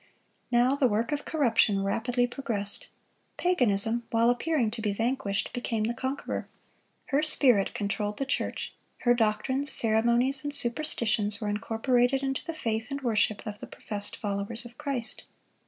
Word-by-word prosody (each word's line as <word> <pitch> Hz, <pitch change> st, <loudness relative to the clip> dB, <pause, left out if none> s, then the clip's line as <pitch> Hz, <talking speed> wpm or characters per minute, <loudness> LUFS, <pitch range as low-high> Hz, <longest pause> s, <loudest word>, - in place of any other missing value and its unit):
Now, 245 Hz, +3 st, +3 dB
the 280 Hz, -2 st, +3 dB
work 230 Hz, +5 st, -1 dB
of 290 Hz, -1 st, -3 dB
corruption 230 Hz, -9 st, +2 dB
rapidly 240 Hz, +5 st, 0 dB
progressed. 235 Hz, -6 st, 0 dB, 0.5 s
Paganism, 235 Hz, -, +4 dB
while 230 Hz, +1 st, +3 dB
appearing 245 Hz, -2 st, 0 dB
to 225 Hz, 0 st, -5 dB
be 210 Hz, -2 st, -1 dB
vanquished, 225 Hz, -2 st, -1 dB
became 235 Hz, -3 st, -2 dB
the 230 Hz, +2 st, -1 dB
conqueror. 260 Hz, +4 st, -4 dB, 0.6 s
Her 280 Hz, +1 st, +2 dB
spirit 255 Hz, -9 st, +3 dB
controlled 205 Hz, 0 st, -2 dB
the 275 Hz, -, -2 dB
church. 270 Hz, -, -3 dB, 0.3 s
Her 240 Hz, -, +4 dB
doctrines, 255 Hz, +5 st, 0 dB
ceremonies, 235 Hz, +4 st, +2 dB
and 290 Hz, 0 st, -3 dB
superstitions 230 Hz, -5 st, +1 dB
were 210 Hz, -3 st, -3 dB
incorporated 245 Hz, +5 st, +1 dB
into 270 Hz, -1 st, -2 dB
the 330 Hz, -, -6 dB
faith 225 Hz, -5 st, -2 dB
and 280 Hz, 0 st, -4 dB
worship 220 Hz, -4 st, 0 dB
of 210 Hz, -1 st, -6 dB
the -, -, -8 dB
professed 205 Hz, -1 st, -4 dB
followers 205 Hz, +3 st, -3 dB
of 240 Hz, 0 st, -12 dB
Christ. 255 Hz, -4 st, -2 dB
235 Hz, 150 wpm, -28 LUFS, 215-265 Hz, 0.6 s, Paganism